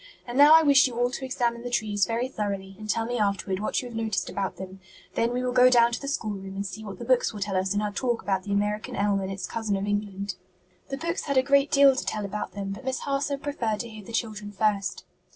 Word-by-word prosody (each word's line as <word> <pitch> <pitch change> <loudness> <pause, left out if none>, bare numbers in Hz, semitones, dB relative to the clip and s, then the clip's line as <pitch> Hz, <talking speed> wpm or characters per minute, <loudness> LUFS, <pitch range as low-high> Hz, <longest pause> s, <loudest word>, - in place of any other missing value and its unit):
"And 240 - -6
now 290 +3 +8
I 320 - +7
wish 280 -2 +6
you 240 -2 -7
all 245 0 +2
to 265 - -5
examine 240 -3 -1
the 245 - -5
trees 210 -4 +1
very 235 +2 -1
thoroughly 200 -5 -4
and 215 0 -8
tell 225 +2 +1
me 245 0 -2
afterward 200 -2 0
what 215 - -1
you - - -6
have 240 - -9
noticed 220 -5 -1
about 195 -2 -2
them; 190 0 -8 0.3
then 230 +1 +1
we 250 +1 -1
will 250 - 0
go 250 0 +6
down 235 -1 +5
to 235 - -3
the 280 - -6
schoolroom 200 -8 -4
and 200 +1 -3
see 215 +3 -7
what 200 -2 -7
the 235 - -7
books 255 0 +3
will 210 - -8
tell 200 -1 -2
us 190 +1 0
in 205 - +1
our 210 - -1
talk 240 +2 -1
about 195 -2 0
the 200 - -7
American 210 +1 -1
elm 200 -1 +1
and 190 0 -4
its 195 0 -4
cousin 220 -3 -2
of 195 - -2
England." 200 -2 -3 0.5
The 270 - -3
books 335 +4 -3
had 280 -2 0
a 260 - +5
great 280 +1 +3
deal 275 -1 +6
to - - -2
tell 210 -1 -3
about 200 -1 -4
them, 195 0 -4
but 200 +6 -7
Miss 260 0 -2
Harson 280 0 -1
preferred 235 -8 -2
to 235 - -7
hear 215 -1 -10
the 215 - -11
children 215 -3 -3
first. 205 -1 0
215 Hz, 270 wpm, -26 LUFS, 200-250 Hz, 0.5 s, now